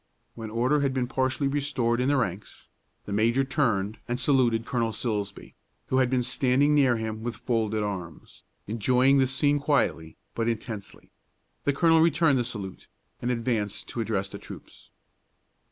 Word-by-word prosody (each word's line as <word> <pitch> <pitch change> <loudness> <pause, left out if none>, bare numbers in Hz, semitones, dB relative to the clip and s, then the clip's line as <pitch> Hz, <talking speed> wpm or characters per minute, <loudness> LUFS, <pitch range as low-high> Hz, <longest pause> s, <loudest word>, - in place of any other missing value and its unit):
When 115 -2 -7
order 125 +7 +1
had 140 -2 0
been 130 -1 +1
partially 130 +2 0
restored 135 -4 0
in 130 - +1
the 145 0 +3
ranks, 100 -5 -4 0.4
the 100 - -5
major 115 +5 +2
turned 115 -7 0
and 120 0 -2
saluted 125 -4 +2
Colonel 115 -3 -1
Silsbee, 105 -3 -4 0.4
who 130 - +1
had 130 -1 +3
been 125 -1 +1
standing 135 +4 +2
near 135 -5 +4
him, 110 0 -4
with 120 0 -4
folded 110 -3 -1
arms, 90 -6 -6 0.2
enjoying 125 +5 +3
the 130 - +3
scene 145 +2 +2
quietly, 140 - 0 0.2
but 115 0 -1
intensely. 110 -2 -5 0.5
The 145 - +2
colonel 165 +2 +4
returned 160 -4 +3
the - - +1
salute, 100 -6 -6 0.3
and 120 - -1
advanced 115 -4 -2
to 120 - -3
address 100 -3 -2
the - - -7
troops. - - -12
120 Hz, 160 wpm, -26 LUFS, 110-135 Hz, 0.5 s, near